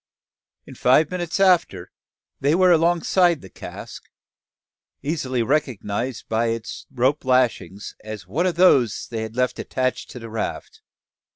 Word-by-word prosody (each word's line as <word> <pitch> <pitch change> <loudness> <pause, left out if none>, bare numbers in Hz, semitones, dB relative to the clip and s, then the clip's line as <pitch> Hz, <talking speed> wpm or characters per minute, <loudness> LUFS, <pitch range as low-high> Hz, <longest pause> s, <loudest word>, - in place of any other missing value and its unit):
In - - -11
five 140 +6 +3
minutes 175 -1 -3
after, 175 - +2 0.5
they 145 +4 +2
were 185 0 +5
alongside 170 0 +3
the 95 - -13
cask, - - -10 0.9
easily 130 -5 -1
recognised 130 -3 -2
by 115 +1 0
its 115 -1 -5
rope 130 +4 +1
lashings, 125 -6 0
as 110 -3 -7
one 155 - 0
of 175 - -1
those 135 - +3
they 115 -1 -4
had 110 0 -6
left 125 0 0
attached 130 -1 -2
to - - -9
the 115 -2 -9
raft. 110 - -5
130 Hz, 135 wpm, -22 LUFS, 115-165 Hz, 0.9 s, were